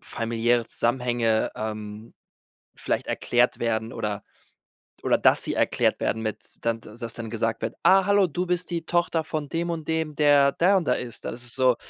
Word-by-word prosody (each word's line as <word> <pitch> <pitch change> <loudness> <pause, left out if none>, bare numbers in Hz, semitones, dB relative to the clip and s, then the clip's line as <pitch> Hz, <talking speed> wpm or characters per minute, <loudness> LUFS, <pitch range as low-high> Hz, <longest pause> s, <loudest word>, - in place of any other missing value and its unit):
familiäre 115 0 0
Zusammenhänge, 120 -2 +1
ähm, 110 0 -6 0.6
vielleicht - - -2
erklärt 120 0 +1
werden 115 -1 -1
oder 105 -1 -4 0.8
oder - - +4
dass - - +3
sie - - -2
erklärt - - +1
werden 110 - -1
mit 110 -1 -5
dann 115 -1 -1
d 110 +1 -13
dass 115 -1 -6
dann 115 -1 -6
gesagt 115 0 -2
wird: - - -2
„Ah 190 0 +6
hallo, 200 -1 +4
du 180 +3 -3
bist 180 0 -1
die 170 -1 -3
Tochter 170 -1 +1
von 155 -2 -4
dem 170 +2 -2
und 165 -2 -4
dem, 160 -2 -1
der 145 -2 +5
der 190 +6 +3
und 175 - 0
der 125 - +2
ist.“ 120 -2 -7
Das 120 +1 -5
ist 120 - -4
so 130 -2 +3
120 Hz, 185 wpm, -25 LUFS, 115-160 Hz, 0.8 s, Ah